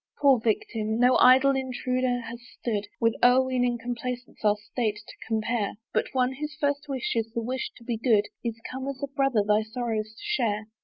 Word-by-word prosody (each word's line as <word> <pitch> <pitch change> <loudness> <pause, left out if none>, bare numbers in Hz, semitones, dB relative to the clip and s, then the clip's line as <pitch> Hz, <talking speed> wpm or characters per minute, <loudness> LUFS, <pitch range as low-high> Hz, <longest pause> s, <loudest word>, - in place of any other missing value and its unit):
"Poor 275 -4 +5
victim! 220 0 -1
no 250 +1 +5
idle 265 +2 +6
intruder 255 -1 -1
has 235 +1 -8 0.2
stood 210 -4 -2
"With 230 -1 +3
o'erweening 250 -1 +3
complacence 245 +1 -5
our 210 -1 +4
state 215 0 -2
to 210 +1 -12
compare, 220 -1 -1 0.2
"But - - +1
one, 255 0 +2
whose 300 +3 -6
first 285 0 0
wish 265 -3 -2
is 225 -1 -1
the 230 - -1
wish 255 +3 -3
to 235 - -15
be 235 -1 -2
good, 220 -3 +3 0.2
"Is 230 -1 -3
come 260 +1 -5
as 275 -2 -4
a - - 0
brother 270 -6 +1
thy 210 +1 +4
sorrows 220 -1 -3
to - - -15
share. 230 - 0
245 Hz, 190 wpm, -27 LUFS, 220-260 Hz, 0.2 s, idle